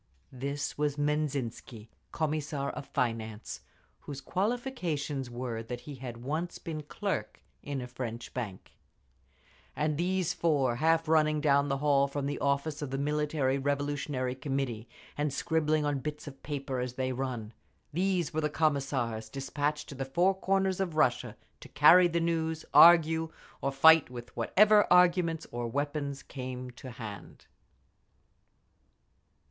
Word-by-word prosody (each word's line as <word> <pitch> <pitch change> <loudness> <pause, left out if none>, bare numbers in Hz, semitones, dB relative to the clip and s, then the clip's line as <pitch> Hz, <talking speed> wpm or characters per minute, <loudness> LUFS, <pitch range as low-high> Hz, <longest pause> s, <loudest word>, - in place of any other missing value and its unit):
This 140 +3 -4
was 150 -1 0
Menzhinsky, 140 -7 -2 0.2
Commissar 150 -3 -2
of 140 - -8
Finance, 115 -5 -3 0.4
whose 140 -2 -7
qualifications 180 - -2
were 120 -2 -4
that 120 +2 -6
he 150 - -9
had 120 -3 -8
once 160 +6 -3
been 160 -3 -5
clerk 145 - -4 0.2
in 140 -2 -4
a 125 - -6
French 125 -2 -6
bank…. 105 -7 -6 1.0
And 150 0 0
these 180 0 0
four 140 -7 +1
half 165 +3 +2
running 155 -1 +3
down 140 -1 +3
the 135 - 0
hall 140 -1 +3
from 140 0 -3
the 145 - -2
office 140 +2 0
of 145 - -3
the 135 - -3
Military 145 -1 0
Revolutionary 140 -2 -1
Committee, 130 -4 -3 0.3
and 150 -1 +1
scribbling 155 +1 +1
on 145 -2 0
bits 150 +3 -5
of 140 -2 -10
paper 140 -3 -4
as 125 0 -3
they 130 0 -2
run—these 135 - -3
were 155 -1 0
Commissars 135 -8 -1
despatched 145 +3 -2
to - - -7
the 135 0 -4
four 175 +9 +2
corners 190 0 0
of 180 -5 -2
Russia 130 -6 +1 0.2
to - - -12
carry 180 +1 +7
the 170 0 0
news, 160 -1 -1
argue, 160 -1 +7 0.3
or 135 - 0
fight—with 135 -4 +4
whatever 205 - +4
arguments 175 -2 +4
or 120 0 -3
weapons 140 +2 -3
came 130 -1 -6
to 130 +2 -10
hand…. 110 -4 -9
145 Hz, 135 wpm, -30 LUFS, 130-160 Hz, 1.0 s, carry